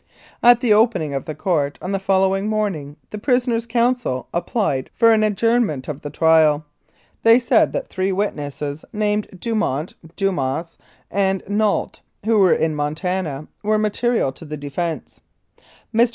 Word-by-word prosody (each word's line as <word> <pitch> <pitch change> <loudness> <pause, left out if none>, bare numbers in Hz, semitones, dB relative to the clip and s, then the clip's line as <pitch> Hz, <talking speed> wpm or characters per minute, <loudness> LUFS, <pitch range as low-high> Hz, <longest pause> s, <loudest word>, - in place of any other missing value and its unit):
At 240 0 +6
the 235 -5 +4
opening 210 -9 +2
of 135 - -3
the 155 - -5
court 150 -7 -1
on 185 - -5
the 195 - 0
following 195 +1 +1
morn 215 -2 0
ing 145 -2 -9 0.2
the 210 - -5
prisoner's 240 -1 +1
counsel 235 - 0
applied 170 - -1
for 230 0 +5
an 220 - +3
adjournment 215 - +1
of 150 -2 -5
the 145 - -6
trial. 155 -1 +3 0.6
They 230 +1 +7
said 245 -2 +3
that - - -3
three 190 +1 -1
witnesses 150 -6 -3
named 210 -1 0
Dumont, 185 - -1 0.2
Dumas 165 -4 -2 0.3
and 195 -1 0
Nault, 205 0 0 0.2
who 220 -1 +3
were 190 -3 +5
in 160 -1 0
Montana, 155 0 -3
were 215 +1 +1
material 215 - 0
to 135 - -13
the 150 -1 -6
defence. 155 +4 -5 0.7
Mr. 235 +2 +4
195 Hz, 150 wpm, -21 LUFS, 150-220 Hz, 0.7 s, They